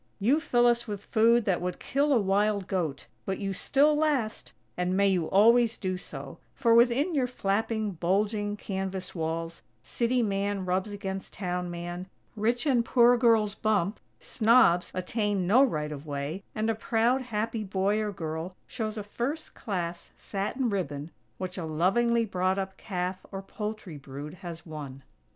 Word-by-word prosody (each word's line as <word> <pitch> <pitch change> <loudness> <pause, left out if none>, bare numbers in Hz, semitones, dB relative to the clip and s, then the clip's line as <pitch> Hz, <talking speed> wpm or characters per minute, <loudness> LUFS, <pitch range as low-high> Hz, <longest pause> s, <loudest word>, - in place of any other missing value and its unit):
You 245 +9 +3
fill 245 -6 +2
us 235 0 +3
with 205 -2 -5
food 230 0 +4
that 185 -4 +1
would 180 0 -3
kill 285 +2 0
a 270 - +5
wild 200 0 +1
goat, 165 -7 -2 0.2
but 190 -1 -2
you 195 -2 -3
still 285 +9 +3
last! 290 -8 0 0.2
And 180 +1 0
may 200 0 +4
you 180 -4 +1
always 230 +3 +5
do 185 -1 -2
so; 180 - -8 0.2
for, 235 -4 +3
within 245 +8 +4
your 265 -4 +2
flapping, 220 -1 -1
bulging 205 +4 0
canvas 190 -2 -4
walls, 165 0 -3 0.2
city 240 - 0
man 200 -1 -1
rubs 185 +3 0
against 195 -1 -5
town 180 -2 -3
man, 175 +1 -5 0.3
rich 235 +5 0
and 255 -5 +3
poor 240 +1 +5
girls 225 -4 +3
bump, 210 -2 0 0.2
snobs 220 -7 +3
attain 200 +1 -1
no 235 +9 +6
right 150 - -1
of 150 +1 -8
way, 145 +5 -4
and 215 +1 0
a 225 - +2
proud, 230 +4 +1
happy 225 -2 -2
boy 195 +1 0
or 210 -1 -1
girl 160 0 -5
shows 220 -2 -4
a 210 - -3
"First 250 +9 -4
Class" 175 -4 -4
satin 210 +5 -2
ribbon 150 -5 -3 0.3
which 185 0 -5
a - - -3
lovingly 225 +9 +2
brought 185 -1 0
up 190 -1 -3
calf 185 -1 -4
or 195 0 -5
poultry 210 -6 -6
brood 140 +3 -8
has 170 -2 -7
won. 145 -4 -8
200 Hz, 165 wpm, -28 LUFS, 180-230 Hz, 0.3 s, no